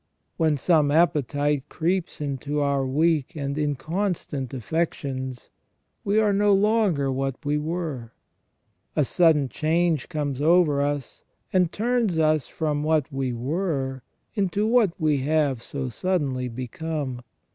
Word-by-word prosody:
When 155 Hz, -3 st, +2 dB
some 155 Hz, 0 st, +3 dB
appetite 145 Hz, -3 st, +1 dB
creeps 175 Hz, +2 st, -1 dB
into 145 Hz, +1 st, -2 dB
our 140 Hz, -2 st, +1 dB
weak 155 Hz, +3 st, +1 dB
and 140 Hz, -2 st, -3 dB
inconstant 150 Hz, -, -2 dB
affec 160 Hz, +6 st, -1 dB
tions, 130 Hz, -2 st, -6 dB, 0.5 s
we 205 Hz, +2 st, +2 dB
are 210 Hz, -2 st, +3 dB
no 205 Hz, 0 st, +4 dB
longer 195 Hz, -9 st, +2 dB
what 135 Hz, +2 st, -3 dB
we 145 Hz, +1 st, +1 dB
were. 155 Hz, -7 st, -4 dB, 0.8 s
A 150 Hz, -, +3 dB
sudden 155 Hz, -1 st, +3 dB
change 160 Hz, +2 st, 0 dB
comes 145 Hz, -5 st, -2 dB
over 155 Hz, -3 st, +4 dB
us 145 Hz, -2 st, -3 dB, 0.3 s
and 180 Hz, -3 st, +3 dB
turns 230 Hz, -5 st, 0 dB
us 155 Hz, -2 st, +2 dB
from 150 Hz, -2 st, -2 dB
what 155 Hz, -1 st, +1 dB
we 135 Hz, -2 st, -1 dB
were 135 Hz, +1 st, -2 dB, 0.3 s
into 200 Hz, -1 st, 0 dB
what 225 Hz, -4 st, +4 dB
we 155 Hz, -3 st, +2 dB
have 145 Hz, -3 st, +1 dB
so 135 Hz, +1 st, -4 dB
suddenly 135 Hz, -, -1 dB
become. 130 Hz, +2 st, -4 dB
150 Hz, 130 wpm, -25 LUFS, 135-170 Hz, 0.8 s, no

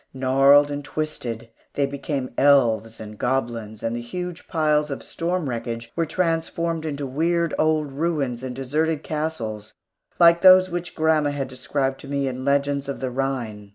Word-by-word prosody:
Gnarled 135 Hz, +2 st, +5 dB
and 145 Hz, 0 st, -4 dB
twisted, 120 Hz, -7 st, -5 dB, 0.2 s
they 140 Hz, -, +2 dB
became 140 Hz, -2 st, -4 dB
elves 115 Hz, -6 st, +3 dB
and 105 Hz, -1 st, -9 dB
goblins, 115 Hz, -4 st, -2 dB
and 115 Hz, +1 st, -1 dB
the 120 Hz, -, -4 dB
huge 180 Hz, +7 st, -6 dB
piles 150 Hz, -3 st, +1 dB
of 140 Hz, -, -5 dB
storm 170 Hz, -1 st, -2 dB
wreckage 115 Hz, -1 st, -4 dB
were 165 Hz, -1 st, 0 dB
transformed 165 Hz, -1 st, -1 dB
into 145 Hz, -2 st, -3 dB
weird 165 Hz, +5 st, 0 dB
old 155 Hz, -2 st, +1 dB
ruins 140 Hz, -5 st, -1 dB
and 130 Hz, -1 st, -5 dB
deserted 150 Hz, +4 st, -1 dB
castles 115 Hz, -10 st, -4 dB, 0.4 s
like 170 Hz, 0 st, +6 dB
those 185 Hz, -1 st, +7 dB
which 175 Hz, 0 st, -4 dB
grandma 155 Hz, -2 st, +2 dB
had 140 Hz, -2 st, -3 dB
described 135 Hz, +1 st, -2 dB
to -, -, -11 dB
me 140 Hz, -1 st, -1 dB
in 130 Hz, 0 st, -4 dB
legends 140 Hz, 0 st, 0 dB
of 140 Hz, -, -4 dB
the 130 Hz, -1 st, -3 dB
Rhine. 120 Hz, -6 st, -3 dB
140 Hz, 160 wpm, -23 LUFS, 125-160 Hz, 0.4 s, those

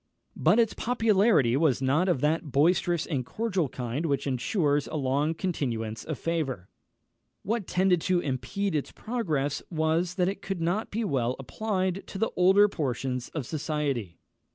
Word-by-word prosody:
_" -, -, -51 dB, 0.3 s
But -, -, +3 dB
its 230 Hz, -2 st, +3 dB
popularity 215 Hz, -, +3 dB
was 140 Hz, -4 st, +2 dB
not 145 Hz, +8 st, +2 dB
of 145 Hz, -8 st, +1 dB
that 155 Hz, 0 st, 0 dB
boisterous 170 Hz, +4 st, +2 dB
and 140 Hz, -7 st, -2 dB
cordial 190 Hz, -, -1 dB
kind 125 Hz, +7 st, -3 dB
which 140 Hz, -2 st, 0 dB
ensures 145 Hz, -, 0 dB
a -, -, -6 dB
long 145 Hz, +3 st, 0 dB
continuance 115 Hz, -, -3 dB
of 155 Hz, -4 st, -4 dB
favour. 135 Hz, -, -2 dB, 0.7 s
What 215 Hz, -1 st, -2 dB
tended 180 Hz, -2 st, +2 dB
to 185 Hz, +1 st, +2 dB
impede 175 Hz, +7 st, -2 dB
its 150 Hz, -3 st, -2 dB
progress 155 Hz, -, -2 dB
was, 165 Hz, +2 st, 0 dB
that 180 Hz, -2 st, +2 dB
it 195 Hz, +1 st, -3 dB
could 195 Hz, -2 st, -4 dB
not 175 Hz, +7 st, -1 dB
be 225 Hz, +3 st, -2 dB
well 130 Hz, -, 0 dB
applied 190 Hz, -, -2 dB
to -, -, -7 dB
the 225 Hz, +3 st, 0 dB
older 190 Hz, +3 st, +6 dB
portions 130 Hz, -, -3 dB
of 150 Hz, -5 st, -2 dB
society. 140 Hz, -, -2 dB
160 Hz, 160 wpm, -27 LUFS, 135-190 Hz, 0.7 s, older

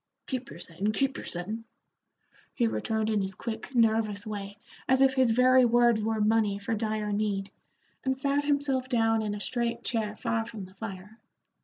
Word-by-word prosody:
"Keep 260 Hz, 0 st, -4 dB
your -, -, -9 dB
settin', 180 Hz, +4 st, -3 dB
keep 270 Hz, +3 st, 0 dB
your -, -, -6 dB
settin'," 210 Hz, +6 st, -4 dB, 0.9 s
he 240 Hz, -, +2 dB
returned 220 Hz, -1 st, -1 dB
in 210 Hz, -2 st, +2 dB
his 190 Hz, 0 st, -4 dB
quick, 235 Hz, +5 st, -6 dB
nervous 220 Hz, -3 st, +2 dB
way, 200 Hz, -1 st, -6 dB, 0.3 s
as 260 Hz, 0 st, +5 dB
if 270 Hz, 0 st, +5 dB
his 260 Hz, -2 st, +3 dB
very 255 Hz, +2 st, +5 dB
words 240 Hz, -2 st, +4 dB
were 220 Hz, 0 st, -1 dB
money 210 Hz, -1 st, +2 dB
for 205 Hz, +3 st, -3 dB
dire 215 Hz, -1 st, -1 dB
need, 205 Hz, -1 st, -1 dB, 0.5 s
and 265 Hz, 0 st, 0 dB
sat 280 Hz, +1 st, +1 dB
himself 280 Hz, -3 st, 0 dB
down 225 Hz, -2 st, +2 dB
in 210 Hz, -1 st, -2 dB
a -, -, -6 dB
straight 235 Hz, +2 st, -2 dB
chair 215 Hz, -3 st, -2 dB
far 225 Hz, +1 st, -1 dB
from 220 Hz, -4 st, -8 dB
the 185 Hz, -, -16 dB
fire. 205 Hz, +1 st, -8 dB
225 Hz, 180 wpm, -28 LUFS, 210-250 Hz, 0.9 s, as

